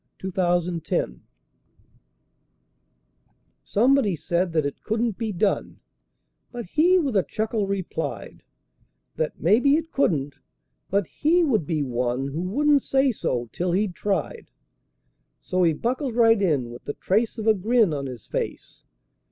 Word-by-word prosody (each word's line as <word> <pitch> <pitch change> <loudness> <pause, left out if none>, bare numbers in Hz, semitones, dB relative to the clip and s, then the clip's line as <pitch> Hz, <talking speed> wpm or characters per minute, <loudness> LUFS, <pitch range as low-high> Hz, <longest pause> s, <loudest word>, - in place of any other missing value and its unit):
37 - - -27
It 175 -2 +1
Couldn't 170 -2 -5
Be - - +2
Done 60 0 -4 2.4
Somebody 235 -3 +2
said 175 +2 -1
that 155 -3 +1
it 140 - -4
couldn't 225 0 -1
be 225 0 -3
done, 200 +2 -1 0.7
But 240 -2 -6
he 340 - +3
with 280 -10 0
a 195 - +5
chuckle 215 +1 -2
replied 195 -2 -4 0.8
That 155 - -2
"maybe 240 - +4
it 325 +1 -2
couldn't," 145 - 0 0.5
but 200 0 +1
he 335 - +2
would 220 - +1
be 155 -3 0
one 125 +1 -1
Who 150 +5 -4
wouldn't 285 +10 +2
say 270 0 +2
so 120 - -2
till 175 0 -2
he'd 195 0 0
tried. 210 - -3 0.9
So 185 -1 -1
he 165 -2 +4
buckled 250 - -2
right 225 -3 +5
in 140 -10 +1
with 120 - -11
the 145 - -3
trace 220 +5 0
of 220 - -4
a 220 - +6
grin 215 -2 +2
On 140 -2 -3
his 125 -4 -9
face. - - -5
195 Hz, 150 wpm, -24 LUFS, 165-240 Hz, 2.4 s, a